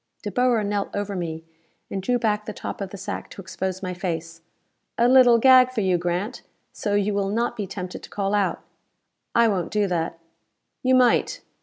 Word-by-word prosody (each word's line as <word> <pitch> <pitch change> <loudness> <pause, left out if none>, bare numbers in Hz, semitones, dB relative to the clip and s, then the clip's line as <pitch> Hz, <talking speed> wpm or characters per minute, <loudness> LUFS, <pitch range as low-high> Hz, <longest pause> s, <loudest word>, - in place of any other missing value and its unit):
De 205 - -4
Boer 245 -2 +2
knelt 205 0 -1
over 200 0 -3
me, 165 -3 -4 0.5
and 195 - -2
drew 245 +6 +1
back 210 -2 0
the 215 - -5
top - - -6
of 195 - -3
the 200 - -9
sack 195 - -6
to - - -12
expose 190 0 -4
my 180 -1 -3
face. 165 -2 -5 0.6
"A 235 - +4
little 250 -2 +7
gag 255 +1 +6
for 240 -4 -1
you, 185 -3 +2
Grant, 175 +5 -2 0.3
so 205 -2 -2
you 205 0 +1
will 200 -1 0
not 235 +4 -1
be 205 -3 -4
tempted 185 -1 -6
to - - -11
call 200 0 -2
out." 205 -2 0 0.7
"I 235 0 +5
won't 190 -5 -1
do 210 -1 +1
that." 170 -3 -2 0.6
"You 260 0 +3
might. 255 - +3
205 Hz, 195 wpm, -24 LUFS, 185-230 Hz, 0.7 s, little